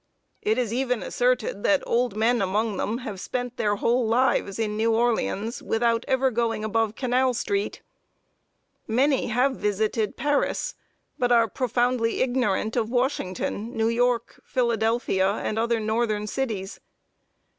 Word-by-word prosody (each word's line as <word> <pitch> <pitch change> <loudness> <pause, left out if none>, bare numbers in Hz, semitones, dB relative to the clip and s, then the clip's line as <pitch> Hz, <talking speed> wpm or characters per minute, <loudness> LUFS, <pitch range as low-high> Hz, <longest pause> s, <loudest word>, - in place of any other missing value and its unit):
It 220 +2 +1
is 240 -3 -1
even 250 -2 0
asserted 245 -5 0
that 295 +4 +2
old 240 -3 0
men 230 +1 +2
among 205 +2 0
them 220 +5 -1
have 205 -4 -5
spent 245 +3 -4
their 205 -1 +1
whole 240 +4 +1
lives 235 -4 +1
in 215 -2 -1
New 225 +1 +2
Orleans 225 - 0
without 230 +1 +1
ever 265 0 +2
going 225 -2 -1
above 220 0 0
Canal 255 0 +1
street! 400 - -2 1.0
Many 265 +5 +2
have 250 +3 +1
visited 210 +1 -1
Paris, 290 - 0 0.5
but 245 -1 +1
are 230 -1 +5
profoundly 245 +1 0
ignorant 245 -4 0
of 225 -3 0
Washington, 235 -3 -2
New 225 0 +2
York, 240 0 0
Philadelphia, 225 -5 +1
and 215 +1 -2
other 235 0 +1
northern 215 -1 0
cities. 210 -5 -3
230 Hz, 135 wpm, -25 LUFS, 215-250 Hz, 1.0 s, are